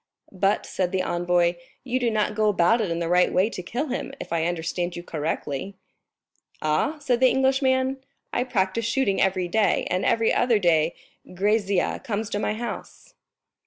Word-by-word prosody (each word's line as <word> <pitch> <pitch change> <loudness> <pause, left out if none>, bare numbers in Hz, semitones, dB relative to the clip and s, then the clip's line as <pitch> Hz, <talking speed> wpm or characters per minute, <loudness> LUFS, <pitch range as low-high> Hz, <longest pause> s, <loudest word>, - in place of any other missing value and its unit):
"But," 195 +2 +1
said 180 -2 -2
the 190 -1 0
envoy, 175 0 +1 0.3
"you 255 0 -1
do 245 -2 +1
not 215 -1 0
go 215 0 +2
about 205 +4 +3
it 205 - -1
in 165 - -1
the 170 -1 -2
right 180 +1 +3
way 195 +5 +2
to 185 - -5
kill 245 - -3
him, 260 +2 -3
if - - -6
I 165 -1 +1
understand 175 +1 -2
you 175 - -6
correctly." 160 +2 -4 0.8
"Aw?" 155 - 0
said 260 -5 0
the 260 0 +6
Englishman, 265 0 +2 0.4
"I 250 - 0
practice 210 -2 0
shooting 230 -4 +1
every 185 -2 +1
day, 205 +3 +2
and 180 +1 0
every 230 -1 +2
other 245 -2 +3
day 165 -4 +2 0.4
Grisier 200 0 +1
comes 220 -4 -3
to 205 - -1
my 210 - -1
house." 235 +1 -7
200 Hz, 175 wpm, -24 LUFS, 175-235 Hz, 0.8 s, the